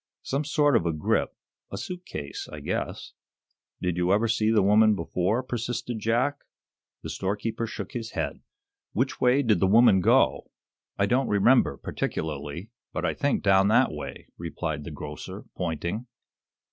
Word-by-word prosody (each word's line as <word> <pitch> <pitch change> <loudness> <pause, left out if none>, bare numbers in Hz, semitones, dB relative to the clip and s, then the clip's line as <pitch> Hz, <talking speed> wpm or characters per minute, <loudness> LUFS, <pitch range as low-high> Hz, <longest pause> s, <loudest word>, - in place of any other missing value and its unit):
"Some 140 +3 -1
sort 145 -2 +3
of 85 -7 +2
a 85 - +1
grip 75 - 0 0.4
a 100 - -4
suit 180 - -6
case, 70 - -6
I - - -7
guess." - - -4 0.7
"Did 90 -1 0
you 90 +1 +2
ever 110 +4 +3
see 110 -1 +1
the 110 -3 +4
woman 105 +2 +5
before?" 95 +6 0
persisted 120 -1 -3
Jack. 120 +7 +1 0.6
The - - -5
storekeeper 105 +4 -2
shook 100 -3 -6
his 115 -2 -5
head. - - -3 0.5
"Which 130 +4 -1
way 130 +3 +4
did 110 -4 +3
the 95 - +3
woman 105 -1 +6
go?" - - +3 0.5
"I 100 - +3
don't 125 +4 +1
remember, 110 +6 +4
particularly, 80 - -4 0.2
but - - -2
I - - +1
think 145 -1 0
down 95 -1 +5
that 105 - +4
way," - - -8
replied 80 -3 -4
the 80 - -6
grocer, 75 0 -8
pointing. 85 +7 -3
105 Hz, 160 wpm, -26 LUFS, 90-120 Hz, 0.7 s, woman